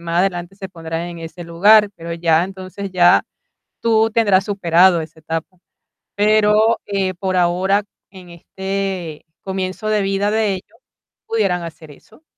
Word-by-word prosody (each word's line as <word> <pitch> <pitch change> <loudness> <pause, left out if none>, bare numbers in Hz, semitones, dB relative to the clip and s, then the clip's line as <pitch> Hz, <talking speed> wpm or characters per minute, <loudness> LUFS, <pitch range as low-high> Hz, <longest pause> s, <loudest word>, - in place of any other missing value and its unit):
más 170 0 -2
adelante 180 -1 -2
se 190 -2 -7
pondrán 165 -2 -5
en 170 -1 -8
ese 165 +2 -9
lugar, 205 +6 +5
pero 170 0 -7
ya, 165 0 +2
entonces, 190 +1 -8
ya 175 -1 +5 0.6
tú 225 -1 +3
tendrás 205 -4 +3
superado 180 -3 +3
esa 160 0 -11
etapa. 165 +3 -5 0.6
Pero, 215 +2 +3
eh, 195 -2 -1
por 185 +1 -2
ahora, 185 +3 +2 0.3
en 185 -2 -14
este 190 -2 -5 0.2
comienzo 190 +2 -4
de 215 -1 +1
vida 195 +1 0
de 215 -2 +1
ellos, 205 +4 -11 0.5
pudieran 195 -6 0
hacer 160 -2 -10
eso, 220 - -21
190 Hz, 145 wpm, -19 LUFS, 170-205 Hz, 0.6 s, lugar